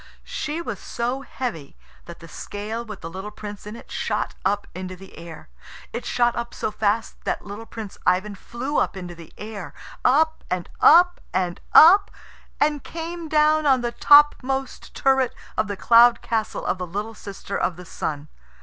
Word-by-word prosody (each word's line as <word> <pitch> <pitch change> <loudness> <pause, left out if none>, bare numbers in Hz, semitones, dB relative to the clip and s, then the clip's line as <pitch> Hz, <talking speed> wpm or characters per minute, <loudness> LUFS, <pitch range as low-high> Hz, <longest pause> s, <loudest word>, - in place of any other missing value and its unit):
She 310 +3 -4
was 225 - -5
so 245 +3 -3
heavy 230 - -6 0.3
that 170 0 -11
the 165 - -11
scale 210 +6 -6
with 215 -4 -9
the 165 - -6
little 190 +3 -6
Prince 210 -1 -9
in 210 - -7
it - - -13
shot - - -2
up 200 +2 0
into 185 0 -6
the 190 +1 -14
air. 165 -2 -10 0.5
It 235 - -4
shot 240 -1 +2
up 235 0 -5
so - - -2
fast 215 +1 -1
that - - -2
little 205 +3 -8
Prince 215 -4 -8
Ivan 190 +3 +1
flew 245 +8 -4
up - - 0
into 180 -2 -7
the 165 -1 -13
sky, 210 -4 -7 0.3
up 315 +5 +3
and 180 -1 -2
up 355 +2 +6
and 180 -2 -1
up, 390 +6 +8 0.5
and 295 -1 +1
came 335 0 -6
down 305 0 +3
on 260 -2 +4
the 240 0 -2
topmost 270 -1 +3
turret 265 -2 +2 0.2
of 215 - 0
the 205 -1 -4
cloud 235 +3 +6
castle 220 -2 -2
of 185 - -1
the 180 - -4
little 205 +6 -4
sister 200 -1 -7
of 180 - 0
the 180 +1 -11
Sun. 150 -3 -4
220 Hz, 175 wpm, -23 LUFS, 190-270 Hz, 0.5 s, up